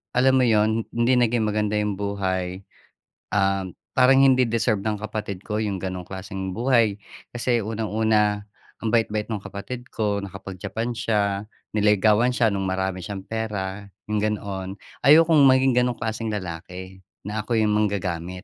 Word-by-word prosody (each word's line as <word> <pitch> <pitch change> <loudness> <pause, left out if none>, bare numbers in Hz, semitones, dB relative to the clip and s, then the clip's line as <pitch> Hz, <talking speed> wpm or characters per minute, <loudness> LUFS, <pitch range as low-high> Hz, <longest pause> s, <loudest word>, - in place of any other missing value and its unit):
alam 130 +1 +4
mo - - +4
'yon 110 0 +2
hindi 120 +2 +3
naging 120 -2 +2
maganda 105 0 0
'yong 105 -1 -1
buhay. 95 -2 -2 0.7
Um, 95 -2 +1 0.2
parang 130 +1 +6
hindi 130 -1 +5
deserve 110 -3 0
ng 105 -2 -1
kapatid 105 -3 -5
ko 105 - -2
'yong 100 -3 -2
ganong 95 -1 -4
klaseng 95 0 -5
buhay. 115 -4 +2 0.4
Kasi 120 -1 +1
unang-una 110 -1 +1 0.4
ang 110 - 0
bait-bait 110 -2 +1
no'ng 110 - -2
kapatid 125 +5 -7
ko. 105 -2 0
Nakapag 95 -1 -8
Japan 115 +4 -3
siya. 105 -3 0 0.3
Niligawan 105 +3 +4
siya 115 -2 +3
no'ng 95 -1 -2
marami 95 0 -1
siyang 95 -1 -6
pera. 105 -3 -4 0.3
'Yong 105 - +1
ganoon. 100 -3 -2 0.4
Ayokong 160 +1 +7
maging 130 0 +4
ganong 125 0 0
klaseng 110 0 -3
lalaki. 95 0 -7 0.3
Na 105 +2 -3
ako'y 115 -2 +1
manggagamit. 95 -4 -1
105 Hz, 145 wpm, -24 LUFS, 95-115 Hz, 0.7 s, Ayokong